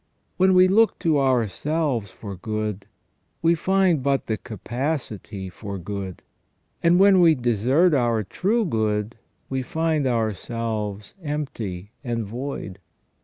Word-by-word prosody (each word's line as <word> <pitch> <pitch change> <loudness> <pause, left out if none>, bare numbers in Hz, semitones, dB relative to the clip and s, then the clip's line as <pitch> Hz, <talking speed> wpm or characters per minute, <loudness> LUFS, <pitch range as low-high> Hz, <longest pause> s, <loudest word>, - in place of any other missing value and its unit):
When 190 0 +4
we 185 0 +7
look 220 +4 +4
to 155 -3 +2
ourselves 130 - 0
for 100 -3 -8
good, 105 +1 -4 0.6
we 165 +1 +5
find 185 -2 +2
but 135 +1 +1
the 110 - -1
capacity 115 - -4
for 100 +2 -7
good; 95 0 -6 0.6
and 170 +1 +4
when 195 -1 +6
we 165 -2 +6
desert 125 - +2
our 120 -5 +2
true 210 - 0
good 110 - -1 0.3
we 130 0 -2
find 160 +1 0
ourselves 110 -2 -2
empty 115 - -4
and 115 -3 -2
void. 115 -4 -6
120 Hz, 120 wpm, -24 LUFS, 105-160 Hz, 0.6 s, we